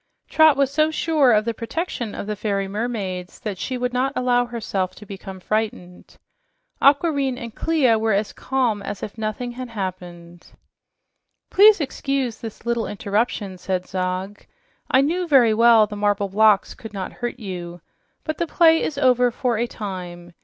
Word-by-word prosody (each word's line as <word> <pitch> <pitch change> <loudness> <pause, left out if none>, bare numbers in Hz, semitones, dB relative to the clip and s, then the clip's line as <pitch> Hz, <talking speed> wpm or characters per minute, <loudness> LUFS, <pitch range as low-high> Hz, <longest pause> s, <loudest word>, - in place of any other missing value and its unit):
Trot 315 -3 +5
was 275 -1 +2
so 310 +1 +3
sure 310 -4 +2
of 215 -1 +3
the 230 - -1
protection 235 - -4
of - - -5
the 210 +1 -3
fairy 200 -1 -2
mermaids 195 -4 -4
that 205 -4 -5
she 255 - -3
would 250 0 -2
not 260 +2 +1
allow 245 -1 +2
herself 205 -6 -3
to 210 - -12
become 195 -1 -9
frightened. 205 -3 -4 0.6
Aquareine 280 -2 +3
and 235 -2 -7
Clia 265 -9 +2
were 220 0 +1
as 200 +1 0
calm 250 -6 -1
as 205 0 -6
if 205 - -6
nothing 220 +2 -4
had 250 0 -7
happened. 175 -4 -7 1.0
"Please 420 +1 +7
excuse 275 -4 -2
this 225 0 -9
little 235 -1 -1
interruption," 205 -2 -2
said 185 0 -2
Zog. 185 +2 -3 0.5
"I 260 - +5
knew 345 +5 0
very 255 -7 +5
well 230 -1 +6
the 210 0 -8
marble 205 -1 0
blocks 210 0 +3
would 220 -2 -9
not 190 -2 -5
hurt 240 0 -5
you. 175 -4 -7 0.4
But 310 -1 -4
the 340 - 0
play 325 0 +4
is 290 - -3
over 250 -2 +4
for 240 -1 -1
a 240 - 0
time. 180 -5 -7
225 Hz, 165 wpm, -22 LUFS, 195-255 Hz, 1.0 s, Please